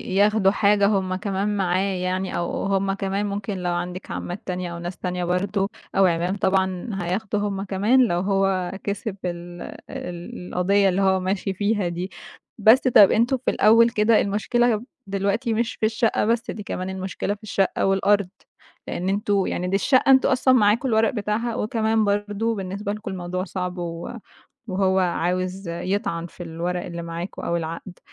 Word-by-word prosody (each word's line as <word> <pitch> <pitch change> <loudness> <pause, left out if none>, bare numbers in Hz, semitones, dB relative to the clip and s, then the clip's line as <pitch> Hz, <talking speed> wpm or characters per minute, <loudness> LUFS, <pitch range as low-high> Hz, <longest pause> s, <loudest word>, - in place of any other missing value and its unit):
ياخدوا 205 -1 +4
حاجة 200 0 +3
هُم 190 -3 0
كمان 200 +2 -1
معاه 185 -1 +1 0.2
يعني، 185 +1 -2
أو 170 - -2
هُم 195 0 +1
كمان 195 +1 -2
ممكن 200 0 -3
لو 180 -1 -2
عندِك 180 +2 -4
عمّات 175 +3 -5
تانية 180 -2 -3
أو 170 - -6
ناس 175 +1 -6
تانية 180 -1 -3
برضه 195 +3 0 0.3
أو 195 0 +5
عِمام 175 +2 +1
طبعًا، 190 +2 0
هياخدوا 200 +4 -2
هُم 200 -1 -2
كمان 210 +7 +3
لو 175 -4 0
هو 195 -1 +1
كسب 200 0 -3
ال 175 0 -6 0.3
ال 175 0 -7
القضية 195 +2 +2
اللي 190 +2 0
هو 190 -1 +3
ماشي 190 +1 -2
فيها 205 -1 0
دي. 175 +2 -4 0.5
بس، 225 +4 +6
طَب 210 -5 +7
أنتم 240 +4 +2
في 255 - -1
الأول 230 +2 +5
كده، 215 0 +3
المشكلة 225 +2 +1 0.3
دلوقتي 200 +5 0
مش 230 +1 -1
في - - -1
الشقة 220 0 +1
بس، 230 +1 0
دي 210 - -7
كمان 185 -1 -4
المشكلة 190 +2 -3
الشقة 195 -2 0
والأرض. 195 0 +2 0.6
لأن 185 +2 -2
أنتم 200 -1 +1
يعني 180 +1 -2
دي 190 - 0
الشقة 260 +6 +4
أنتم 265 - +5
أصلًا 260 -1 +3
معاكم 230 +2 +3
الورق 220 0 +3
بتاعها، 220 +2 -2
وكمان 220 -1 +1
برضه 205 +2 0
بالنسبة 195 +1 -4
لكم 215 -2 -6
الموضوع 185 0 -3
صعب 180 -2 -4
و 170 -1 -5 0.6
وهو 190 0 +2
عاوز 185 +1 -1
يطعن 170 -1 -2
في 175 - -10
الورق 175 +2 -3
اللي 170 -1 -6
معاكم، 170 +3 -6
أو 170 - -1
العقد. 170 +2 -6
195 Hz, 165 wpm, -23 LUFS, 180-210 Hz, 0.6 s, طَب